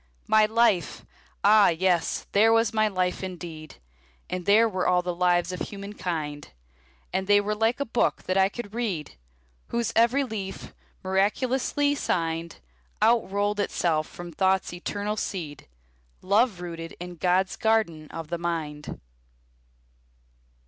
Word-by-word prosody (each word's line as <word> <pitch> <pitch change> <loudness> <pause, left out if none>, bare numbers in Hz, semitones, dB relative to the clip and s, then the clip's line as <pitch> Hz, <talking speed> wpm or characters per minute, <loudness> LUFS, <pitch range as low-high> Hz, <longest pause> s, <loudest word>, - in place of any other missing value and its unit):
My 215 -1 +4
life! 220 -6 +1 0.4
Ah, 210 0 +6
yes, 175 0 0
there 220 +3 +5
was 225 -1 +3
my 215 0 +3
life, 185 -2 -1
indeed! 170 -4 -7 0.6
And 180 0 -4
there 220 +3 +6
were 185 -4 -1
all 180 0 +3
the 180 0 -2
lives 175 0 +2
of 180 - -5
humankind; 180 -8 -5 0.6
And 190 +1 -1
they 205 0 +6
were 205 +1 -1
like 225 +4 +1
a 280 - -1
book 235 -1 0
that 185 - -1
I 190 0 +4
could 210 -1 -8
read, 205 -11 -3 0.6
Whose 235 -2 -2
every 235 +5 +4
leaf, 205 -6 -6 0.3
miraculously 255 +9 +1
signed, 165 - -2 0.4
Outrolled 210 -2 +2
itself 165 -6 0
from 175 0 -9
Thought's 190 +2 +1
eternal 205 +4 -3
seed, 155 -9 -5 0.6
Love 205 0 +2
rooted 165 -1 -7
in 175 0 -8
God's 185 +2 +1
garden 215 -9 0
of 165 -2 -7
the 170 0 -3
mind. 155 -3 -4
190 Hz, 135 wpm, -26 LUFS, 175-215 Hz, 0.6 s, Ah